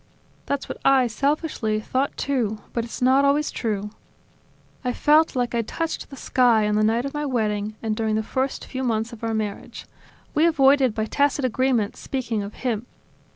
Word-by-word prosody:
"That's 280 -1 -2
what - - -6
I, 270 -2 +5
selfishly, 245 -3 -1
thought 260 +5 -2
too; 240 -6 -1 0.2
but 235 - -1
it's 235 +2 -5
not 265 +2 +5
always 285 +2 +2
true. 210 -3 -3 0.9
I 250 -1 -1
felt 305 +3 +3
like 245 -1 0
I 235 - +1
had 225 - -2
touched 330 -1 -3
the 275 - -9
sky 240 -5 +3
on 210 - 0
the 215 0 +2
night 230 +4 +2
of 275 - -4
my 295 0 -2
wedding 215 -4 -1
and 220 -1 -1
during 220 -1 0
the 220 - 0
first 260 +4 -2
few 260 0 -5
months 225 -1 -1
of 230 - -11
our 225 -1 -1
marriage. 210 -2 -5 0.5
We 315 +3 +4
avoided, 275 -6 +4
by 220 - 0
tacit 285 +2 +1
agreement, 250 -3 +1
speaking 240 -5 -3
of 200 +1 -7
him. 235 -1 -1
245 Hz, 190 wpm, -23 LUFS, 220-275 Hz, 0.9 s, I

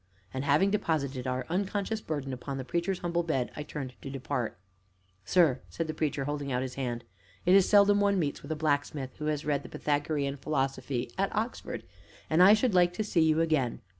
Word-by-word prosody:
And, 130 0 -2
having 155 +7 +4
deposited 140 -10 -1
our 130 0 -1
unconscious 200 +4 -1
burden 145 -6 -3
upon 135 +2 -5
the 130 - -5
Preacher's 175 +5 -1
humble 175 0 0
bed, 155 -7 -1
I - - -4
turned 140 -3 -6
to 135 - -6
depart. 130 -5 -3 0.7
"Sir," 160 -8 +3
said 165 - -3
the 155 - -4
Preacher, 150 -3 -1
holding 145 -1 -3
out 125 0 0
his 130 -1 -5
hand, 120 -3 -3 0.4
"it 180 - +5
is 195 -1 +6
seldom 205 0 +6
one 200 -1 +3
meets 150 -5 -1
with 140 - -8
a - - 0
blacksmith 145 -3 -1
who 150 - -5
has 150 0 -1
read 145 -2 +1
the - - -11
Pythagorean 145 -1 -1
Philosophy 135 -3 -2
at 195 - +2
Oxford, 225 +3 -3 0.5
and 160 +3 +5
I 200 +3 +9
should 220 0 +1
like 175 -1 +4
to 215 - -2
see 190 -5 +1
you 160 0 +4
again. 155 -7 +1
150 Hz, 200 wpm, -29 LUFS, 135-175 Hz, 0.7 s, I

